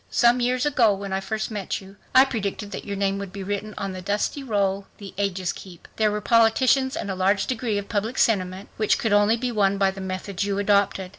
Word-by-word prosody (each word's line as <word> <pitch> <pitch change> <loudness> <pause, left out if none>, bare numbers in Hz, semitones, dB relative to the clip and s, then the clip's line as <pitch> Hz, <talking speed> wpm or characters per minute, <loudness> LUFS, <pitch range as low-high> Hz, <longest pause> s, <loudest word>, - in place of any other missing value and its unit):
Some 240 +1 +4
years 250 +1 +1
ago 245 -8 +3
when 195 0 -5
I 190 - 0
first 220 +3 -3
met 205 -3 -3
you 195 0 -14 0.2
I 260 +1 +8
predicted 210 -4 -4
that - - -6
your 200 - -4
name 195 0 0
would 200 -2 -6
be 195 0 -6
written 205 +2 -4
'on 195 -1 -3
the 185 - -6
dusty 205 +9 -1
roll 200 -5 -1
the 200 -2 -10
ages 190 -3 -1
keep.' 180 -3 -12
There 215 -1 +3
were 210 0 -2
politicians, 255 +5 +3
and 205 -12 -3
a - - -3
large 195 +2 +2
degree 230 -4 -2
of 200 0 -4
public 220 +3 -2
sentiment, 190 -3 +1
which 215 -1 +2
could 220 -3 0
only 205 +2 +4
be 245 +1 -2
won 200 -3 +2
by 195 -1 +2
the 195 0 -9
methods 190 +1 -4
you 200 -1 -1
adopted 200 -2 +1
205 Hz, 230 wpm, -24 LUFS, 195-225 Hz, 0.2 s, I